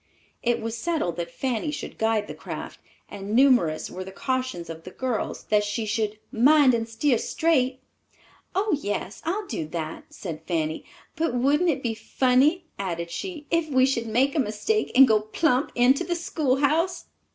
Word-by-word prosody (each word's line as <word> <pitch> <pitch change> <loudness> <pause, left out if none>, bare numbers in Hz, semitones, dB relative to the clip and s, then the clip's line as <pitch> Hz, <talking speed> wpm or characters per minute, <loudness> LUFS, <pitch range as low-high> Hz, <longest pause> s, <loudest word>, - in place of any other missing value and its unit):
It 240 0 +1
was 225 0 -4
settled 305 - -1
that 170 -1 -3
Fanny 250 - -2
should 295 - -6
guide 220 -1 +1
the - - -7
craft, - - -7 0.3
and 205 +2 -5
numerous 240 - +4
were 185 - -5
the 190 - -9
cautions 255 -5 -2
of 165 0 -8
the - - -8
girls 250 +3 -3
that 210 -1 +4
she 205 +2 -2
should 215 0 -1
"mind 275 +2 +5
and 230 -1 -1
steer 235 +2 +1
straight." 265 -6 +1 0.8
"Oh, 395 -2 +2
yes, 205 -2 -4
I'll 395 +6 -1
do 160 - -4
that," 160 -1 -5
said 165 -5 -7
Fanny; 160 -3 -1 0.3
"but 325 -6 -1
wouldn't 290 +8 +3
it 305 - -1
be 235 -2 0
funny," 260 - +2
added 170 -3 -3
she, 335 - -5
"if 335 -2 +1
we 260 -2 +4
should 235 -4 -1
make 255 +5 +2
a 315 - 0
mistake 260 - 0
and 265 +1 +9
go 220 -2 +4
plump 250 +6 0
into 255 +6 +4
the 350 0 -1
schoolhouse!" 310 +2 0
245 Hz, 175 wpm, -25 LUFS, 210-295 Hz, 0.8 s, and